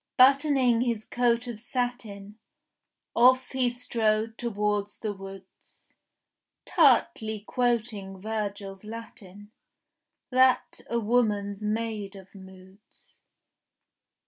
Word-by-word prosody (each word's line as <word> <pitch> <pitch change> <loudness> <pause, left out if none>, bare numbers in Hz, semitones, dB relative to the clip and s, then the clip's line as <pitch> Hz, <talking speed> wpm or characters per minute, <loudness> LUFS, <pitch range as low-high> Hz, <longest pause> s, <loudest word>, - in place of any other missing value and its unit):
Buttoning 265 -2 +5
his 235 -3 -1
coat 240 0 +1
of 235 -3 -6
satin, 225 -4 -4 0.8
Off 255 +2 +5
he 260 -2 +2
strode 225 -2 -1
towards 210 -3 -2
the 215 -2 -3
woods, 195 -1 -14 0.7
Tartly 220 -1 +3
quoting 225 -6 -1
Virgil's 200 -2 -4
Latin, 210 -2 -10 0.8
That 255 0 +3
a 235 - 0
woman's 210 -3 0
made 215 -2 -3
of 190 -1 -13
moods. 190 +1 -17
220 Hz, 90 wpm, -27 LUFS, 200-245 Hz, 0.8 s, Buttoning